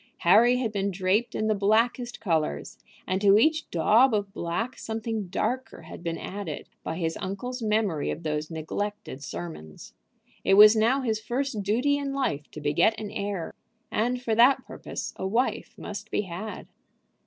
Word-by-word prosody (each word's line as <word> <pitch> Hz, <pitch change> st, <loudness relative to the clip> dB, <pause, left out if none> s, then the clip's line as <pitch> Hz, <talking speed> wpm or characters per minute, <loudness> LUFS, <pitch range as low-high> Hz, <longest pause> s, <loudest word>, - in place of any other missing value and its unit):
Harry 225 Hz, +8 st, +6 dB
had 240 Hz, -4 st, -1 dB
been 200 Hz, -1 st, -1 dB
draped 195 Hz, +5 st, 0 dB
in 215 Hz, -, -1 dB
the 215 Hz, -, +3 dB
blackest 230 Hz, +4 st, +1 dB
colors, 160 Hz, -, -1 dB, 0.3 s
and 185 Hz, +1 st, -1 dB
to 200 Hz, 0 st, +6 dB
each 310 Hz, +7 st, +2 dB
daub 220 Hz, +9 st, +4 dB
of 200 Hz, -1 st, -2 dB
black 225 Hz, +10 st, -3 dB
something 220 Hz, -2 st, -3 dB
darker 245 Hz, +4 st, -3 dB
had 160 Hz, -, -10 dB
been 165 Hz, -1 st, -3 dB
added 190 Hz, -6 st, -6 dB, 0.2 s
by 160 Hz, -, -4 dB
his 165 Hz, -2 st, -1 dB
uncle's 235 Hz, +7 st, -5 dB
memory 210 Hz, -8 st, 0 dB
of 170 Hz, -, -4 dB
those 150 Hz, -1 st, -2 dB
neglected 160 Hz, -2 st, -5 dB
sermons. 80 Hz, -, -8 dB, 0.5 s
It 195 Hz, -, +4 dB
was 210 Hz, +2 st, +9 dB
now 235 Hz, +5 st, +3 dB
his 220 Hz, -4 st, -1 dB
first 245 Hz, 0 st, -2 dB
duty 250 Hz, +9 st, +1 dB
in 280 Hz, -1 st, -3 dB
life 150 Hz, -, -2 dB
to -, -, -9 dB
beget 155 Hz, +9 st, +2 dB
an 210 Hz, -2 st, -6 dB
heir, 200 Hz, -5 st, -4 dB, 0.4 s
and 245 Hz, +4 st, 0 dB
for 235 Hz, -3 st, -1 dB
that 245 Hz, +5 st, +5 dB
purpose -, -, -6 dB
a 190 Hz, -, -2 dB
wife 235 Hz, +6 st, -1 dB
must 210 Hz, +1 st, -7 dB
be -, -, 0 dB
had. 195 Hz, +3 st, -6 dB
210 Hz, 165 wpm, -27 LUFS, 175-235 Hz, 0.5 s, was